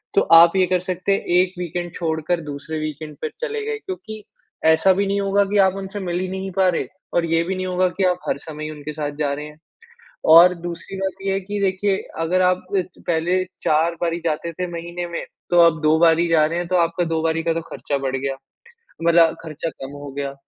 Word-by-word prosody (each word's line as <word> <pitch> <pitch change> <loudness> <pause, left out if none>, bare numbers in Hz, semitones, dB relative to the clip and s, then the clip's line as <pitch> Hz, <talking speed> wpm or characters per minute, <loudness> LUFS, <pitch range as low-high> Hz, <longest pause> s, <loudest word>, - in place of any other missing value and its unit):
तो - - +6 0.2
आप 170 +2 +5
ये 185 - +4
कर 185 0 +1
सकते 185 +1 -2
हैं 195 - +1 0.2
एक 185 0 -1
वीकेंड 175 0 -4
छोड़कर 165 +1 -1
दूसरे 150 +1 -6
वीकेंड 155 0 -6
पे 155 - -2
चले 450 -2 -2
गए। 440 0 -2
क्योंकि 220 - -7 0.4
ऐसा 160 +4 +5
भी 200 +2 0
नहीं 200 +1 0
होगा 200 +1 +2
कि 205 +1 -1
आप 190 - -1
उनसे 195 +1 -6
मिल 175 -2 -2
ही 185 - -2
नहीं 190 +1 -4
पा 190 -1 +4
रहे 175 - -1 0.3
और 170 - +2
ये 165 0 +1
भी 190 +3 -3
नहीं 185 0 -3
होगा 185 0 +2
कि, 190 +2 -3
आप 180 -1 +2
हर - - 0
समय 155 0 -8
ही 155 - -4
उनके 150 0 -7
साथ 150 -1 -3
जा 145 -2 0
रहे 150 +1 -5
हैं। 150 - -14 0.7
और, 170 +3 +9
दूसरी 175 +2 -7
बात 190 -1 -2
ये 195 - +1
है 195 - 0
कि 205 +2 -5
देखिए, 195 0 +1 0.2
अगर 180 +3 +1
आप 185 0 +1
इत 185 - 0 0.2
पहले 170 +2 +1 0.3
4 160 +2 +2
बारी 170 0 0
जाते 165 +1 -1
थे 180 +3 -3
महीने 170 +1 -5
में, 170 - -5 0.3
तो 175 -1 +5
आप 165 -2 +5
2 155 +1 +4
बार 165 -1 +5
ही 170 - +2
जा 160 -2 +4
रहे 165 +2 -2
है, 175 - -2
तो 185 - +1
आपका 170 0 +1
2 160 - +1
बारी 165 0 0
का 165 0 +1
तो 165 - -1
ख़र्चा 140 -1 -3
बढ़ 135 -1 -2
गया, 135 0 -3 0.7
मतलब 165 -1 +5
ख़र्चा 160 0 -4
कम 135 -3 -9
हो 145 -1 -8
गया। 140 -1 -3
170 Hz, 235 wpm, -21 LUFS, 160-185 Hz, 0.7 s, और